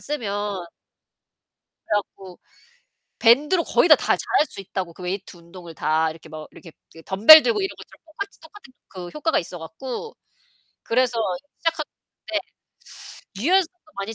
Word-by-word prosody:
쓰면. 205 -9 -4 1.2
그래 - - 0
갖고 190 -2 -5 0.8
밴드로 295 +9 +4
거의 345 - +2
다 305 - +10
다 - - -6
잘할 300 - +1
수 - - -9
있다고 185 -2 -5
그 180 - -13
웨이트 185 +1 -5
운동을 170 0 -13
다 160 +1 +1
이렇게 160 0 -12
뭐 155 0 -9
이렇게 165 - -14 0.2
그 165 - -14
덤벨 225 +12 +9
들고 440 -4 +1
이런 385 - -1
것처럼 - - -15
똑같이 400 +6 -8
똑같은 320 -4 -16 0.4
효과가 320 +2 +1
있어 175 0 -5
갖고 255 - -7 0.7
그래서 245 0 +1 0.4
시작했는데 325 -2 -4 0.9
유연성도 345 - 0
많이 200 +3 -4
220 Hz, 300 characters per minute, -23 LUFS, -, 1.2 s, 다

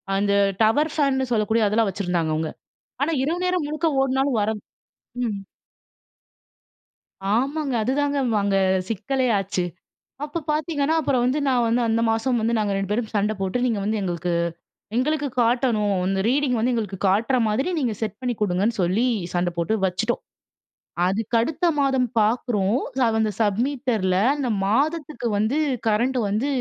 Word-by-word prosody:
அந்த 200 0 +1 0.3
டவர் 290 +8 +3
ஃபேன்னு 265 -4 +1
சொல்லக்கூடிய 220 0 +2
அதெல்லாம் 215 0 +2
வச்சிருந்தாங்க 175 -4 -1
அவுங்க. 160 0 -2 0.5
ஆனா, 310 +4 +1
இரவு 335 +5 -1
நேரம் 360 -4 0
முழுக்க 310 +2 -1
ஓடுனாலும் 265 -2 +1
வரும். 210 0 -1 0.6
ம். 210 -4 -2 2.0
ஆமாங்க. 275 +2 0
அதுதாங்க 285 +4 0 0.3
அங்க 200 -1 +1 0.3
சிக்கலே 255 +5 -1
ஆச்சு. 190 -2 -2 0.6
அப்போ 300 +3 -3
பாத்தீங்கன்னா 305 0 0
அப்புறம் 255 -5 +1
வந்து, 260 +4 +1
நான் 250 -2 +3
வந்து 240 +2 +2
அந்த 225 +1 +1
மாசம் 240 +2 0
வந்து 230 +1 0
நாங்க 205 -2 0
2 195 -1 -2
பேரும் 220 0 -1
சண்டை 210 +1 +1
போட்டு 195 +5 -1
நீங்க 225 -4 0
வந்து 215 +1 0
எங்களுக்கு, 175 -1 -2 0.6
எங்களுக்கு 290 +3 +1
காட்டணும். 230 -4 +2
அந்த 195 0 0
ரீடிங் 270 -2 +1
வந்து 245 +2 +1
எங்களுக்கு 205 -5 -3
காட்டுற 225 +7 +2
மாதிரி 260 +11 0
நீங்க 240 -5 0
செட் 215 0 -3
பண்ணி 245 -2 -1
கொடுங்கன்னு 205 +3 +1
சொல்லி, 195 +8 +2 0.3
சண்டை 175 0 0
போட்டு 195 +6 +1
வச்சுட்டோம். 210 +6 -1 0.9
அதுக்கு 220 +4 -1
அடுத்த 315 +7 -1
மாதம் 265 -3 +2
பார்க்குறோம், 215 0 +1 0.4
அந்த 215 -1 +1
சப் 210 -1 +1
மீட்டர்ல 240 -10 0 0.2
இந்த 260 -4 -1 0.2
மாதத்துக்கு 290 +2 0
வந்து 220 +8 +1 0.3
கரண்ட் 240 +5 +1
வந்து 220 +8 0
230 Hz, 145 wpm, -23 LUFS, 205-270 Hz, 2.0 s, டவர்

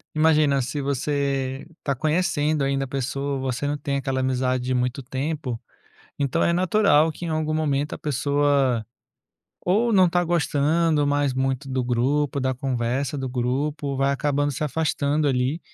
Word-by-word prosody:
imagina, 155 -3 +3
se 135 +3 -3
você 140 -1 -1
está 140 - -1
conhecendo 155 -1 +1
ainda 135 0 0
a - - -10
pessoa, 140 +1 -2
você 130 +1 -2
não 145 - 0
tem 140 -1 -2
aquela 135 -1 -1
amizade 130 -1 0
de 130 - -1
muito 125 +1 -1
tempo, 135 -2 -3 0.6
então 140 +3 0
é 170 - +3
natural 175 -3 +3
que 175 - -8
em - - -3
algum 155 0 -1
momento 145 -2 0
a - - -8
pessoa, 140 -4 +1 0.8
ou 220 +6 +2
não 190 -3 +6
está 175 0 +2
gostando 160 -1 +1
mais 145 -1 +1
muito 135 +1 -1
do 130 -1 -1
grupo, 135 +4 0
da 130 0 0
conversa 130 +2 -2
do 135 - -3
grupo, 135 +3 -2
vai 135 +1 +2
acabando 145 0 0
se 145 - -3
afastando, 150 0 0
ali. 130 +3 0
140 Hz, 160 wpm, -24 LUFS, 130-150 Hz, 0.8 s, não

